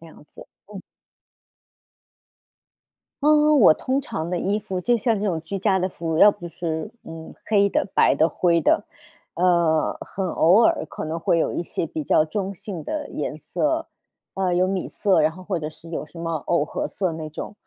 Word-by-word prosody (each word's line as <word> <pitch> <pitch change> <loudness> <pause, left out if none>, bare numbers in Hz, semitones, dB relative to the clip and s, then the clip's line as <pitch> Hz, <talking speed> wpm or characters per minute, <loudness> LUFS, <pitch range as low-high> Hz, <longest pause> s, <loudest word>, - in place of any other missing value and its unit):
这 165 - -13
样 155 - -16
子。 - - -14 0.3
嗯。 195 - -7 2.4
嗯， 300 -1 +5
我 170 -7 +7
通 265 - -1
常 175 -10 -5
的 180 - -1
衣 200 +4 0
服 195 -3 -4
就 240 +5 +2
像 225 0 +1
这 210 - -2
种 175 -5 0
居 180 +5 -5
家 190 -1 +1
的 185 - 0
服， 165 -3 -4
要 210 - +8
不 175 -4 -9
是， 160 -2 -4
嗯， 165 0 -10
黑 200 -2 +3
的、 - - 0
白 - - +5
的、 160 - +3
灰 170 0 +2
的。 - - +2 0.5
呃， 170 -3 +2
很 195 - -4
偶 185 +10 +4
尔 160 - +2
可 - - -7
能 160 +2 -3
会 165 0 +1
有 - - 0
一 - - -2
些 165 - -3
比 155 -1 -5
较 155 - +3
中 195 +4 -3
性 180 -3 -7
的 300 -2 -4
颜 - - -4
色， - - -1 0.5
呃， 185 -2 0
有 180 +1 +3
米 190 -2 -2
色， 195 -5 +1
然 155 - +3
后 185 +2 -12
或 180 -3 -2
者 150 - -4
是 160 +1 -15
有 160 -2 -4
什 155 +3 -16
么 165 0 -3 0.2
藕 170 -4 +2
荷 - - -3
色 185 -4 -2
那 155 -1 -6
种， 155 - -7
180 Hz, 215 characters per minute, -23 LUFS, 160-200 Hz, 2.4 s, 要